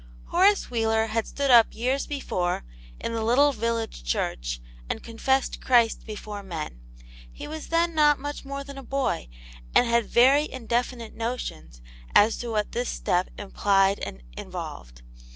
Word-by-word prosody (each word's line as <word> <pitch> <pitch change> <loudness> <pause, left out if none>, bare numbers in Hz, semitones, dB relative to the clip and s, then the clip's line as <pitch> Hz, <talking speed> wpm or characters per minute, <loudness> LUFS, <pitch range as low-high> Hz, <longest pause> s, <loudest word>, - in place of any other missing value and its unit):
HORACE 390 0 +3
WHEELER 225 -1 +2
had 225 0 -1
stood 280 -1 0
up 235 -2 +6
years 255 +4 0
be 290 -1 -3
fore, 175 - -2 0.3
in 230 - -3
the 225 -1 -1
little 270 +6 +4
village 230 - -2
church, - - -2 0.3
and - - -3
confessed 265 +4 0
Christ 235 -3 +3
before 210 -1 -6
men. 160 - -6 0.5
He - - -8
was 315 0 -7
then 335 +1 +1
not 295 -2 +5
much 290 +1 -6
more 275 0 -5
than 280 0 -9
a - - -10
boy, 270 - -1 0.5
and 245 - +6
had 235 -1 +2
very 275 +5 +4
indefinite 240 -1 -2
notions 225 - -5 0.3
as 215 +2 +6
to 240 - -5
what 210 -2 -1
this 245 +1 -2
step 180 +1 0
implied 195 -1 +2
and 65 -1 -7
involved. - - -8
230 Hz, 155 wpm, -26 LUFS, 205-270 Hz, 0.5 s, up